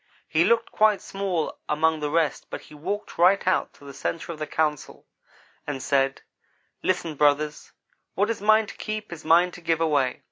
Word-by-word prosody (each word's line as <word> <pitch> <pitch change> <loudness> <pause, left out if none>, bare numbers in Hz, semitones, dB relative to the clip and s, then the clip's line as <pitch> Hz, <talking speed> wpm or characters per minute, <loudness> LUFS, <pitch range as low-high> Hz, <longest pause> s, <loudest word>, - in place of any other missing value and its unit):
He 165 +2 +3
looked 235 -1 +2
quite 215 -2 +3
small 195 -5 -3
among 160 +1 +2
the 150 -1 -2
rest 160 0 0
but - - -6
he - - -16
walked 200 +8 -5
right 185 +3 +5
out 185 - +1
to 140 - -17
the 140 - -9
centre 165 +4 -4
of 160 - -8
the 155 - -3
council 150 -2 -2 0.6
and 145 -2 -3
said: 135 0 0 0.6
"'Listen, 175 -3 -1
brothers 150 +1 +1 0.4
what 205 +3 +1
is 225 - -5
mine 215 +1 +5
to - - -11
keep 215 -3 -5
is 165 - -10
mine 170 +3 +4
to 175 - -12
give 165 -1 0
away. 145 -5 +1
165 Hz, 185 wpm, -25 LUFS, 150-195 Hz, 0.6 s, right